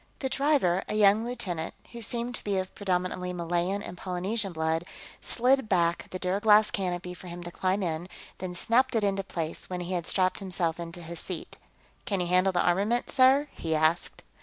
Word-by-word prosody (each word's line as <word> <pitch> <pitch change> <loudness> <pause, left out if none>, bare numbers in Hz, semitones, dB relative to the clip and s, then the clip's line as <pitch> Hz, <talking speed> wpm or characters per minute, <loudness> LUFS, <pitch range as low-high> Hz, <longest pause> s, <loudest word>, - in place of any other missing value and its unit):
The 265 - -2
driver, 270 - +2
a - - -1
young 210 +1 +5
lieutenant 185 -9 -3 0.2
who 235 - -8
seemed 235 +2 0
to - - -2
be 200 -2 0
of 185 0 -3
predominantly 180 -2 -1
Malayan 175 +3 -1
and 175 - -7
Polynesian 190 +3 -2
blood, 160 0 0 0.4
slid 255 -1 +2
back 170 -2 +1
the 185 - -4
duraglass 210 +4 +4
canopy 180 -2 -2
for 180 +1 -11
him 175 0 -7
to 175 - -7
climb 190 +3 0
in, 170 +1 -3 0.3
then 180 -1 -4
snapped 245 +7 +3
it 220 - +2
into 195 -1 +1
place 165 -4 -5
when 180 -1 -3
he 175 +1 -4
had 175 -2 -2
strapped 185 -1 +1
himself 175 -4 -2
into 170 +1 -7
his 170 0 -6
seat. 180 -4 -6 0.5
"Can 200 -5 -1
you 180 - 0
handle 185 +2 +3
the 175 - +1
armament, 205 +7 +1
sir?" 270 +2 +5
he 160 -1 -2
asked. 155 +2 +1
185 Hz, 190 wpm, -28 LUFS, 175-210 Hz, 0.5 s, young